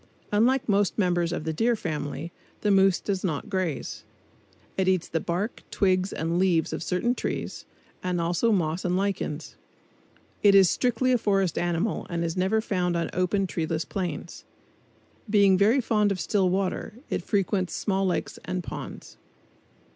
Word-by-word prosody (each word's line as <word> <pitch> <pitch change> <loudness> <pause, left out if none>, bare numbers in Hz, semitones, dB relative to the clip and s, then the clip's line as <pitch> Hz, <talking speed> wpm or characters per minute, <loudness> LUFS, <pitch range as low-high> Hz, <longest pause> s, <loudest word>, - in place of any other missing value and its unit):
Unlike 240 +5 +3
most 200 -2 +2
members 175 -4 +1
of 170 - -3
the 160 0 -2
Deer 230 +8 +2
Family, 155 -3 -4 0.3
the 210 - +2
moose 195 -1 +4
does 195 -2 -2
not 160 -3 -2
graze. 185 -7 -2 0.7
It 190 -1 0
eats 185 -2 +2
the 165 - -1
bark, 180 +8 -3
twigs 185 -1 +1
and 165 +2 -1
leaves 180 -4 +2
of - - -3
certain 180 +8 0
trees, - - -4 0.4
and 180 -1 -1
also 175 +7 +1
moss 170 -3 0
and 180 0 +1
lichens. 190 -6 -3 0.8
It 200 -1 +6
is 190 -3 +7
strictly 250 +1 +1
a 250 - +3
forest 195 -5 +1
animal 175 +4 -1
and 170 -1 -2
is 165 0 -2
never 190 +4 +1
found 180 -5 0
on 170 - -2
open, 185 +2 +1
treeless 160 -3 -2
plains. 175 -4 -5 0.9
Being 200 -2 +5
very 210 +8 +4
fond 210 -4 +2
of 190 - -2
still 190 -2 +1
water, 190 +2 -2 0.2
it - - 0
frequents 195 -2 0
small 195 -2 0
lakes 180 - -2
and 185 -1 -3
ponds. - - -8
185 Hz, 160 wpm, -26 LUFS, 175-205 Hz, 0.9 s, is